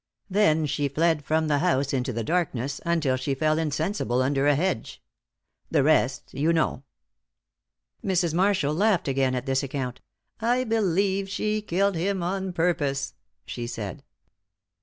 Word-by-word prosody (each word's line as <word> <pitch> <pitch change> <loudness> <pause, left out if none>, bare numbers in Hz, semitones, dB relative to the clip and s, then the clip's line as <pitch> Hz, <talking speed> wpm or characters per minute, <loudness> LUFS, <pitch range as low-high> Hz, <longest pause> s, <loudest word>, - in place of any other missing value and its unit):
Then 160 -6 +3
she 145 0 0
fled 155 +2 +1
from 160 +2 +1
the 145 -2 +2
house 140 -5 +1
into 130 0 0
the 115 -1 -3
darkness 140 -4 -1
until 155 -6 +1
she 135 +1 -2
fell 155 +2 +1
insensible 155 - 0
under 135 +1 +1
a 145 - +5
hedge. 170 -6 -2 0.7
The - - +3
rest - - +1
you 155 +4 +1
know." 160 -5 +1 1.2
Mrs. 180 -4 +1
Marshall 180 -5 +2
laughed 195 0 +2
again 135 -1 +1
at 125 0 -3
this 135 -1 +1
account. 130 -2 -4 0.4
"I 245 +3 +1
believe 195 -3 +1
she 215 +2 -1
killed 200 0 +1
him 185 +2 -1
on 190 +1 -2
purpose," 150 -5 0 0.3
she 120 -1 -5
said. 105 -6 -6
160 Hz, 145 wpm, -26 LUFS, 135-190 Hz, 1.2 s, a